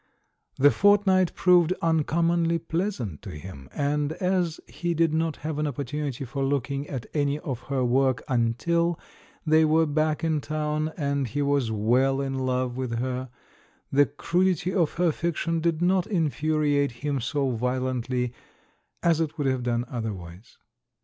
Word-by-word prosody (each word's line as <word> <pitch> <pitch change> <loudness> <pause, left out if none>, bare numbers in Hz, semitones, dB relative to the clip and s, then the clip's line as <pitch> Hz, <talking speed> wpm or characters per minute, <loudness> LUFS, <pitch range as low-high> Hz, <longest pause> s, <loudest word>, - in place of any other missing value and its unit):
The 145 +2 +6
fortnight 195 -3 +3
proved 180 -1 +4
uncommonly 165 +1 +2
pleasant 165 - -3
to - - -8
him, 75 -4 -9
and 145 +1 -1
as 180 -2 0
he 175 -1 -3
did 165 -1 +2
not 160 -1 0
have 155 -1 -2
an 150 - 0
opportunity 140 -1 -4
for 135 +2 -3
looking 140 +1 -1
at 130 -5 -4
any 145 -1 +1
of 135 -5 -5
her 135 -2 +1
work 130 +1 +2
until 155 +8 +1 0.5
they 155 0 +5
were 160 +1 +4
back 155 +1 0
in 160 -2 +1
town 155 +1 -2
and 140 -3 -1
he 145 +6 -1
was 140 -5 +1
well 125 +6 +2
in 135 -1 -2
love 130 -1 -1
with 125 -3 -2
her, 130 +1 -3 0.6
the 145 +1 +4
crudity 180 +4 0
of 170 -5 +1
her 175 -1 +2
fiction 165 +1 -1
did 165 0 0
not 185 0 +2
infuriate 155 - +1
him 145 -2 0
so 135 +2 0
violently 125 0 -1 0.7
as 165 -2 +3
it 160 0 -2
would 145 - -1
have 130 -1 +1
done 120 0 -1
otherwise. 100 -5 -7
145 Hz, 150 wpm, -26 LUFS, 130-165 Hz, 0.7 s, The